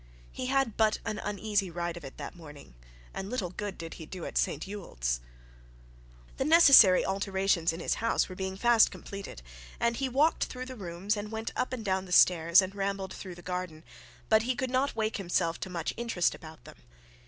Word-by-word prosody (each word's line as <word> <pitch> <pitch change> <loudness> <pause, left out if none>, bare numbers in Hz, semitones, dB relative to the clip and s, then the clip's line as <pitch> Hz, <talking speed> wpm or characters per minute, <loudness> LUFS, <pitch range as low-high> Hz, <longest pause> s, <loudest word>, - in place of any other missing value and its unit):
He 255 - -5
had 270 -4 +1
but 220 -1 +3
an 215 - -3
uneasy 205 -1 -1
ride 170 0 -4
of 170 - -9
it 135 - -10
that 145 +2 -7
morning, 145 - -13 0.4
and 195 - -5
little 210 -8 -3
good 205 0 -5
did 165 -1 -7
he 160 - -10
do 180 -1 -7
at - - -7
St 150 - 0
Ewold's. - - -3 1.2
The - - 0
necessary 275 - +7
alterations 190 -3 0
in 165 - -7
his - - 0
house 230 - +1
were 185 - -8
being 190 0 -4
fast 235 +1 +5
completed, 200 - -9 0.4
and 235 0 +1
he 270 -1 -1
walked 290 +6 +2
through 255 0 -7
the 255 0 -8
rooms, 190 0 -3
and 210 +1 -6
went 220 0 -4
up 255 - -1
and 240 -4 -5
down 190 -1 0
the 180 - -12
stairs 170 0 +6
and 190 +1 -5
rambled 195 -1 -3
through 185 -3 -8
the 175 - -13
garden; 180 -3 -5 0.4
but 220 0 +4
he 250 +3 -1
could 260 0 -3
not 265 +2 0
wake 220 -1 -1
himself 175 -3 -1
to - - -5
much 170 -3 -3
interest 230 -7 0
about 160 -1 -12
them. - - -13
195 Hz, 200 wpm, -29 LUFS, 175-225 Hz, 1.2 s, necessary